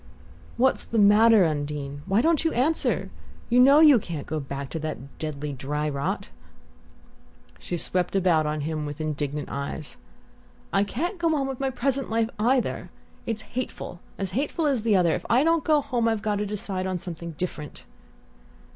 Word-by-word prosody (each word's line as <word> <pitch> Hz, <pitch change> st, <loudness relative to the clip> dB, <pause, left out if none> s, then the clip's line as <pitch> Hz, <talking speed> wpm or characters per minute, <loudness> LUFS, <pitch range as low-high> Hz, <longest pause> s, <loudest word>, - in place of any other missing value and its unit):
"What's 260 Hz, +2 st, +3 dB
the 230 Hz, -, -3 dB
matter. 210 Hz, 0 st, +6 dB
Undine? 145 Hz, -2 st, -3 dB
Why 200 Hz, +5 st, +2 dB
don't 325 Hz, -2 st, +3 dB
you 325 Hz, -, +1 dB
answer? 290 Hz, +7 st, 0 dB, 0.4 s
You 245 Hz, -, +5 dB
know 275 Hz, +4 st, +7 dB
you 295 Hz, -6 st, +8 dB
can't 165 Hz, -7 st, -6 dB
go 155 Hz, 0 st, -3 dB
back 140 Hz, -1 st, -6 dB
to 165 Hz, -, -3 dB
that 140 Hz, -3 st, -6 dB
deadly 150 Hz, -2 st, -4 dB
dry 150 Hz, +3 st, -3 dB
rot!" 140 Hz, -1 st, -2 dB, 1.3 s
She 175 Hz, -, -4 dB
swept 180 Hz, +2 st, -1 dB
about 170 Hz, -5 st, +3 dB
on 150 Hz, 0 st, -2 dB
him 155 Hz, 0 st, -3 dB
with 145 Hz, +1 st, -7 dB
indignant 150 Hz, -1 st, -3 dB
eyes. 140 Hz, +2 st, -5 dB, 0.8 s
"I 195 Hz, -, +4 dB
can't 340 Hz, -, -3 dB
go 330 Hz, -2 st, +2 dB
on 275 Hz, -2 st, 0 dB
with 270 Hz, -2 st, -4 dB
my 270 Hz, 0 st, 0 dB
present 270 Hz, +1 st, -1 dB
life 225 Hz, +1 st, 0 dB
either. 245 Hz, +3 st, +1 dB, 0.4 s
It's 220 Hz, -2 st, -2 dB
hateful 245 Hz, -7 st, -5 dB, 0.2 s
as 195 Hz, -2 st, -3 dB
hateful 290 Hz, -, -1 dB
as 275 Hz, -6 st, +2 dB
the 220 Hz, -2 st, +2 dB
other. 175 Hz, -3 st, +3 dB
If -, -, -4 dB
I 250 Hz, +4 st, +4 dB
don't 330 Hz, 0 st, +2 dB
go 305 Hz, -2 st, +3 dB
home 250 Hz, -5 st, 0 dB
I've 225 Hz, -2 st, 0 dB
got 210 Hz, -2 st, 0 dB
to 205 Hz, 0 st, -2 dB
decide 195 Hz, -2 st, -3 dB
on 185 Hz, -1 st, -1 dB
something 170 Hz, -1 st, -7 dB
different." 150 Hz, -5 st, -5 dB
195 Hz, 175 wpm, -25 LUFS, 155-255 Hz, 1.3 s, you